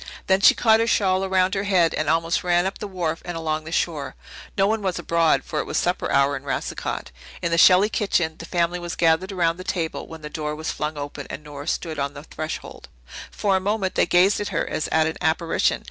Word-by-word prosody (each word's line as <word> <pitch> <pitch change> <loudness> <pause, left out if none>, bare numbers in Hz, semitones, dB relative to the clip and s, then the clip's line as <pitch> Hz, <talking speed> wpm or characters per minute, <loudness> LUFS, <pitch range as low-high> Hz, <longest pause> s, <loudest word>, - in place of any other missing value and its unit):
Then 190 0 +2
she - - +7
caught 220 -1 +4
her 230 - +1
shawl 190 -4 +2
around 190 0 +2
her 195 0 -1
head 180 -4 +3
and 155 -1 -1
almost 165 +1 +1
ran 175 0 +2
up 190 - -3
the 210 - -5
wharf 170 -4 -3
and 175 -1 -5
along 155 -1 -2
the 160 - -7
shore. 155 -5 -2 0.4
No 195 - +4
one 220 +2 0
was 190 -3 -1
abroad, 165 -1 +2
for - - -3
it - - -2
was - - -2
supper 180 +1 0
hour 140 +1 +3
in 135 - -5
Racicot. 135 - -4 0.3
In 170 - 0
the 170 - +2
Shelley 185 +4 +7
kitchen 180 -7 0
the 165 - -7
family 175 0 0
was 175 0 -5
gathered 170 +3 +2
around 170 -3 +1
the 185 - -7
table, 165 -3 -3
when 160 -1 -11
the - - -5
door 150 0 -4
was 160 +1 -3
flung 150 0 -4
open 145 -1 -6
and 150 - -7
Nora 145 -1 -9
stood 160 -3 -2
on 140 +1 -2
the 145 - -9
threshold. 155 0 -7 0.4
For 200 -2 0
a - - +3
moment 195 0 -1
they - - +2
gazed 185 +3 +4
at 205 - -2
her - - -1
as - - -2
at 160 0 +2
an 160 - -3
apparition. 165 +1 +1
170 Hz, 240 wpm, -23 LUFS, 155-190 Hz, 0.4 s, she